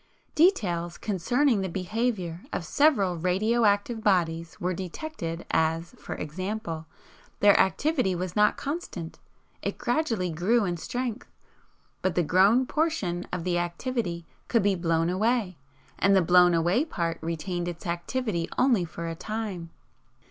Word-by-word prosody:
"Details 180 - +2
concerning 230 - +1
the 190 - -2
behaviour 185 -2 -2
of 180 - -3
several 205 - +3
radio 210 +7 +1
active 205 +2 +1
bodies 170 -5 +1
were 180 +1 -1
detected, 175 - -5
as, 160 +1 +1
for - - -7
example, 170 0 -4 0.5
their 205 -1 +6
activity 255 - +2
was 180 0 -4
not 210 0 +4
constant; 275 - -5 0.4
it - - -3
gradually 225 - 0
grew 200 +8 +2
in 175 -2 -1
strength, 245 +6 -4 0.7
BUT 185 -3 0
THE 175 - +3
GROWN 195 - +4
PORTION 250 - -1
OF 180 -2 -3
THE 175 -1 0
ACTIVITY 175 0 -3 0.2
COULD 230 -4 +2
BE 200 0 +3
BLOWN 165 -1 +1
AWAY, 205 - 0 0.4
AND 200 0 +4
THE 190 - +4
BLOWN 180 0 +6
AWAY 175 - +2
PART 170 - -3
RETAINED 175 +2 -3
ITS 175 -1 -6
ACTIVITY 175 +1 -2
ONLY 240 -9 +3
FOR 170 +1 -7
A 165 - -3
TIME. 205 -2 -5
185 Hz, 140 wpm, -27 LUFS, 170-225 Hz, 0.7 s, their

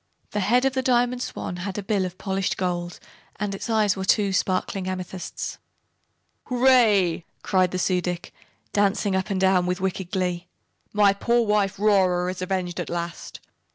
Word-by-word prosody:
The 210 - -1
head 240 +6 +3
of 270 - +2
the 260 - 0
Diamond 245 -1 +2
Swan 180 - -5
had 190 +2 -5
a 205 - -3
bill 195 -1 0
of 180 0 -6
polished 195 -1 -2
gold 175 -1 -2 0.4
and 205 -1 -3
its 195 - -6
eyes 215 -3 +3
were 190 - -4
two 195 0 +2
sparkling 185 0 -1
amethysts. 185 0 -5 0.9
"Hooray!" 225 -9 +4 0.2
cried 185 -2 +2
the 185 - -3
Su 180 0 +1
dic, 175 0 -4 0.4
dancing 205 -1 +2
up 190 +1 -1
and 195 -2 -1
down 190 -1 +3
with 180 +1 -1
wicked 190 -1 -2
glee. 180 -2 -2 0.4
"My 205 -1 +4
poor 235 +3 +1
wife, 205 -2 +1
Rora, 185 -3 +3
is 185 - -8
avenged 185 -2 -2
at - - -4
last. 170 0 -5
190 Hz, 170 wpm, -24 LUFS, 180-210 Hz, 0.9 s, Hooray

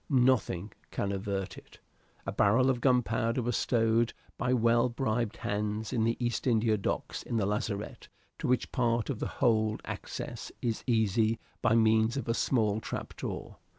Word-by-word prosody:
Nothing 125 - +2 0.2
can 100 - -2
avert 100 -1 -3
it. - - -19 0.5
A - - -2
barrel 120 +6 +4
of 125 -2 -3
gunpowder 120 -2 +2
was 120 -1 0
stowed 115 -1 +2 0.2
by 125 - -1
well 120 0 +3
bribed 120 -2 -1
hands 105 +1 -2
in 110 -2 +2
the 115 - +1
East 120 +1 -1
India 110 -2 +3
Docks 100 - -3
in 115 - -3
the 105 - +1
lazarette, 105 0 -3 0.3
to - - -2
which 125 -1 +1
part 120 -1 +1
of 120 - -5
the - - -2
hold 110 -4 +1
access - - -6
is 115 -2 -2
easy 110 -1 +2 0.2
by 115 - +3
means 110 +2 +3
of 130 - -3
a 115 - +2
small 110 -4 +1
trap - - -6
door. - - -6
115 Hz, 165 wpm, -30 LUFS, 110-120 Hz, 0.5 s, barrel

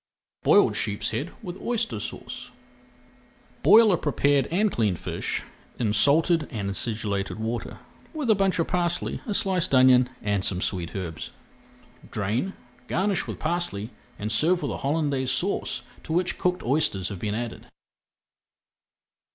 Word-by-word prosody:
BOILED - - +5
SHEEPSHEAD - - -2
WITH 185 -1 -7
OYSTER 235 -1 -1
SAUCE - - -7 1.1
Boil 220 -1 +7
a 180 - +3
prepared 145 -2 +2
and 200 +5 +1
cleaned 105 -6 +1
fish - - -3 0.3
in 110 -4 0
salted 155 - +4
and 100 -6 -3
acidulated 100 -2 -2
water 115 +2 -4 0.3
with 305 -5 -3
a 220 - +6
bunch 195 -2 +1
of 165 - +1
parsley, 175 -1 -1
a 210 - -1
sliced 185 -8 +1
onion, 130 -1 +6
and 100 -2 0
some 95 -2 -1
sweet 90 -3 -3
herbs. 85 -5 -5 0.8
Drain, 110 - -1 0.3
garnish 195 +1 0
with - - -5
parsley, 155 - -2 0.3
and 105 +1 -3
serve 165 +9 +3
with 145 - -1
a - - -3
Holandaise 140 -3 0
Sauce 175 +10 0 0.2
to 160 - -5
which 180 +1 0
cooked 180 0 0
oysters 120 - +1
have 100 -4 -6
been 105 +2 -2
added. 120 0 -5
140 Hz, 140 wpm, -26 LUFS, 105-180 Hz, 1.1 s, Boil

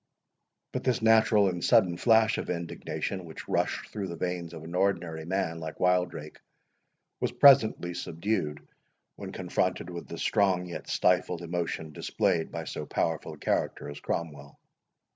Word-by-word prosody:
But - - -3
this 125 -3 0
natural 110 -2 +5
and 90 -2 -2
sudden 95 -8 +4
flash 110 +2 +4
of - - -5
indignation, 90 +2 -4
which 80 -2 -10
rushed - - -1
through 100 -3 -4
the 85 - -5
veins 90 -1 -3
of 80 - -9
an 85 +2 -8
ordinary 90 -4 0
man 85 -2 -1
like 80 -1 -7
Wildrake, 90 -4 0 0.8
was - - 0
presently 115 -10 +5
subdued, 85 -3 -3 0.5
when - - -7
confronted 90 - -1
with 85 -1 -7
the 85 - -7
strong 95 -3 +2
yet 85 - -7
stifled 90 -1 +1
emotion 85 -2 -3
displayed 80 +2 0
by - - -4
so - - -6
powerful 80 -2 -1
a - - -11
character - - -1
as 75 - -9
Cromwell. 70 -4 -5
90 Hz, 150 wpm, -28 LUFS, 80-100 Hz, 0.8 s, natural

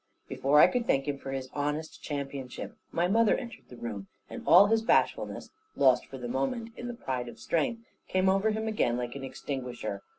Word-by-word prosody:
Before 145 +2 +3
I - - +10
could 245 -2 0
thank 135 +1 +2
him 140 -1 -2
for 135 - -6
his 135 -1 -4
honest 150 +2 -3
championship 140 -3 -5 0.2
my 170 +1 +1
mother 225 +3 +4
entered 235 -4 -8
the 125 - -11
room, 105 -5 -6 0.2
and - - -6
all 200 - +9
his 225 +2 +2
bashfulness 225 - +1 0.2
(lost 130 -2 +4
for 135 - -8
the 125 -1 -5
moment 135 - -2
in 240 - -6
the 240 - -5
pride 130 - -3
of - - -11
strength) 230 +8 -1 0.2
came 185 0 +1
over 195 +3 +3
him 220 +1 -2
again 165 - +1
like 120 0 -4
an 140 - -6
extinguisher. 125 -6 -5
145 Hz, 200 wpm, -29 LUFS, 130-215 Hz, 0.2 s, I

